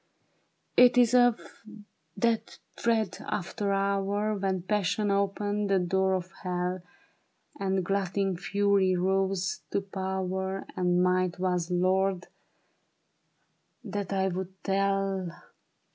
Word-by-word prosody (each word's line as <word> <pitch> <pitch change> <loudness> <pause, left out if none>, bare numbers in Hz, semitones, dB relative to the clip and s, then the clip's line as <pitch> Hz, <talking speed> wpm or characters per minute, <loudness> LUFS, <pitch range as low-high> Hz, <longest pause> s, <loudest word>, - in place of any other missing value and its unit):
It 250 0 +7
is 245 -1 +5
of 245 -2 +5 0.8
that 230 -1 0 0.2
dread 220 -5 0
after 200 +1 -3
hour 200 +2 0
When 190 -2 -1
passion 205 +1 0
oped 200 0 +1
the 205 -1 0
door 190 +1 +1
of 185 0 -4
hell, 180 0 -2 0.8
And 190 -2 0
glutting 195 0 0
fury 195 +1 +2
rose 190 0 0
to - - 0
power, 190 0 -3
And 180 -1 +2
might 180 -1 +1
was 180 -2 -1
lord, 185 +1 +1 1.5
that 200 -2 -4
I 190 -1 +1
would 190 +1 -5
tell. 195 -1 0
190 Hz, 105 wpm, -28 LUFS, 185-200 Hz, 1.5 s, It